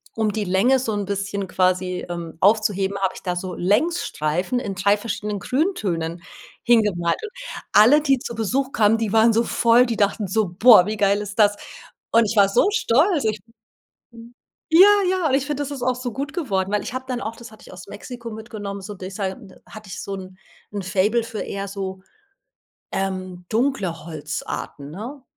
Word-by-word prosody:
um 220 -2 0
die 215 0 -1
Länge 195 +8 +3
so 235 -3 -2
'n 205 -1 -2
bisschen 200 0 -3
quasi, 185 0 0
ähm, 170 -2 -6
aufzuheben, 200 -2 +2
habe 190 -1 0
ich - - -11
da 180 -1 -2
so 180 +1 -5
Längsstreifen 190 - 0
in 200 -6 -5
3 200 +2 +2
verschiedenen 210 -1 -4
Grüntönen 190 - -1 0.4
hingemalt. 210 -8 +2
Und 425 - -6 0.4
alle, 245 +9 +7
die 275 -3 +2
zu 235 - -6
Besuch 255 +5 -1
kamen, 215 +1 +3
die 225 -2 -2
waren 225 +1 +5
so 230 +2 +3
voll 235 +2 +4
die 230 - -1
dachten 205 0 +1
so: 215 +2 +1
„Boah, 210 +1 +7
wie 215 +2 -3
geil 200 0 +2
ist 205 +1 -7
das.“ 205 -1 +5 0.6
Und 230 0 +5
ich 215 +2 -2
war 200 -2 +5
so 200 - +3
stolz. 310 - +2
Ich 215 -1 -1 0.7
Mhm, 235 +1 -14 0.3
ja, 350 +5 +8 0.2
ja. 365 -3 +1
Und 265 - +1
ich 275 0 +1
finde, 290 -1 -2
das 285 - -5
ist 275 -3 -6
auch 255 0 +1
so 250 -2 -5
gut 280 +6 -4
geworden. 195 - -1
Weil 210 - +1
ich - - -6
habe 260 0 -5
dann 250 -2 -2
auch 225 +2 -5
das 235 -1 -11
hatte 215 - -16
ich - - -14
aus 180 -1 -11
Mexiko 235 +4 -8
mitgenommen, 215 -3 -7
so, 205 +2 -7
dieser 190 +1 -4
n 190 0 -13
hatte 215 -2 -12
ich - - -6
so 200 - -6
'n 185 -1 -10 0.4
'n 205 -1 -4
Faible 200 +5 +1
für 230 -2 -6
eher 200 0 -4
so, 190 -1 -6 0.9
ähm, 185 -2 -4
dunkle 215 - -1
Holzarten, 150 -2 -6
ne? 245 - -8
210 Hz, 195 wpm, -22 LUFS, 190-240 Hz, 0.9 s, ja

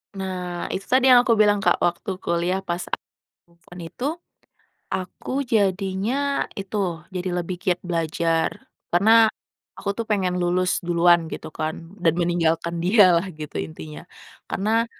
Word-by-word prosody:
Nah, 180 -2 -4
itu 195 - -4
tadi 260 0 +4
yang 245 - +9
aku 230 - +5
bilang 205 -1 +4
Kak, - - +2
waktu 175 +4 -1
kuliah 175 +3 0
pas 175 -1 -3
aku - - -4 0.4
move 170 +1 -29
on 175 - -9
itu, 250 - -6 0.9
aku 255 +9 -3
jadinya 215 +5 0
itu, 195 -5 -3
jadi 185 0 -3
lebih 180 +1 -5
giat 180 -1 0
belajar 165 -1 0 0.4
karena 220 +5 +6 0.5
aku 200 - -4
tuh 230 - -2
pengen 185 -4 0
lulus 180 +1 +1
duluan 170 -1 +4
gitu 160 - -7
kan, 155 +1 -3 0.2
dan 165 -2 +2
meninggalkan 170 -1 0
dia 180 -1 +5
lah 185 - -4
gitu 150 - -6
intinya 80 -1 -7 0.4
karena 225 +4 0
180 Hz, 145 wpm, -23 LUFS, 170-205 Hz, 0.9 s, yang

